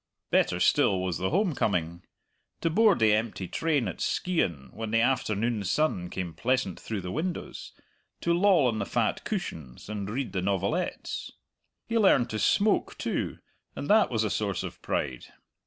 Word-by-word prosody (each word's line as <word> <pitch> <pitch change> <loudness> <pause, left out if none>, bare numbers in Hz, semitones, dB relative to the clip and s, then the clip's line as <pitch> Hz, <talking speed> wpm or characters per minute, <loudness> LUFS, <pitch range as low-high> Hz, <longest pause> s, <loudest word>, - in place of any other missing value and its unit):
Better - - +2
still 95 - +3
was 90 -2 -2
the 95 - 0
home 190 0 +1
coming 85 - -1 0.6
to 165 - +1
board 215 +3 +5
the 110 -2 +4
empty 105 -4 -1
train 150 - 0
at 95 - -6
Skeighan 85 - -1
when 110 0 -5
the 115 +1 +2
afternoon 115 -3 +1
sun 95 - 0
came 90 -3 -4
pleasant 115 - -1
through 110 -3 -4
the 90 0 -5
windows, 170 - -4 0.5
to 170 - +2
loll 180 -4 +4
on 110 -3 -1
the 100 - -1
fat - - 0
cushions 70 +1 -5
and 105 -2 -4
read 120 -2 -3
the 95 - -1
novelettes. 100 - -2 0.5
He 230 0 0
learned 130 - +4
to 110 - -2
smoke 205 - +2
too, - - -2 0.4
and 145 - -5
that 215 0 +5
was 110 -3 0
a 105 - -1
source 100 -4 -1
of - - -7
pride. 65 -4 -2
110 Hz, 170 wpm, -28 LUFS, 95-155 Hz, 0.6 s, board